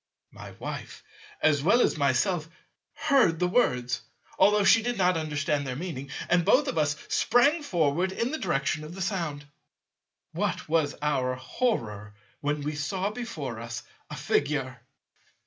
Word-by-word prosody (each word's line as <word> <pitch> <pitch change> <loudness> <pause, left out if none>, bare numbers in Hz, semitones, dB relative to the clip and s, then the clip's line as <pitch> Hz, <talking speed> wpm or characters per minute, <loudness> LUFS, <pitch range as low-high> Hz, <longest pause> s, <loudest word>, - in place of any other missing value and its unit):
My - - -10
Wife - - -7 0.4
as 150 -2 +4
well 200 - +4
as - - +3
myself 155 +4 +1 0.5
heard 260 - +3
the 180 +2 +1
words, 125 - +1 0.4
although 210 0 +5
she 215 +4 +6
did 240 0 -2
not 180 -1 +3
understand 150 -2 -1
their 130 - -3
meaning, 140 -4 -5 0.2
and 175 -1 +3
both - - +4
of 165 - -1
us 150 0 +1
sprang 285 +7 +3
forward 175 - +1
in 230 +6 -2
the 315 - -3
direction 155 -4 -1
of 155 +3 -9
the 190 - -6
sound. 165 -7 -3 0.9
What - - -2
was 155 -2 +1
our 130 -4 +1
horror 115 - -2 0.2
when 145 0 -1
we 150 +2 -3
saw 185 +7 -2
before 155 - -5
us 115 +1 -6 0.3
a - - -6
Figure! 130 -4 -1
155 Hz, 150 wpm, -27 LUFS, 140-190 Hz, 0.9 s, she